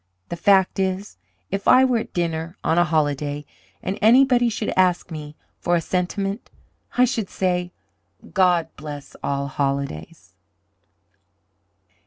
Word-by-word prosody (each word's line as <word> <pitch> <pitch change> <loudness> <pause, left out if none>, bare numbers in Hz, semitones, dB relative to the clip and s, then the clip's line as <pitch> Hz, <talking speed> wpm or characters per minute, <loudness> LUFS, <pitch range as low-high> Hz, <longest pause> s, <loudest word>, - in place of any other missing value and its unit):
The - - -3
fact 190 +1 +3
is, 190 +1 -2 0.3
if 195 +1 -3
I 260 +1 +7
were 250 -3 +2
at - - -7
dinner 165 0 -3
on 165 - +2
a - - +6
holiday, 145 -2 -1 0.4
and 190 - -3
anybody 245 +1 +5
should 220 -1 -3
ask 180 -1 +2
me 150 -1 -7 0.2
for 175 - +1
a - - +3
sentiment, 195 +5 -2 0.5
I 250 - +6
should 225 -5 -2
say, 180 -1 -1 0.6
'God 180 -4 +3
bless 145 -1 -8
all 140 0 -1
holidays!'" 140 - -4
180 Hz, 130 wpm, -22 LUFS, 150-200 Hz, 0.6 s, I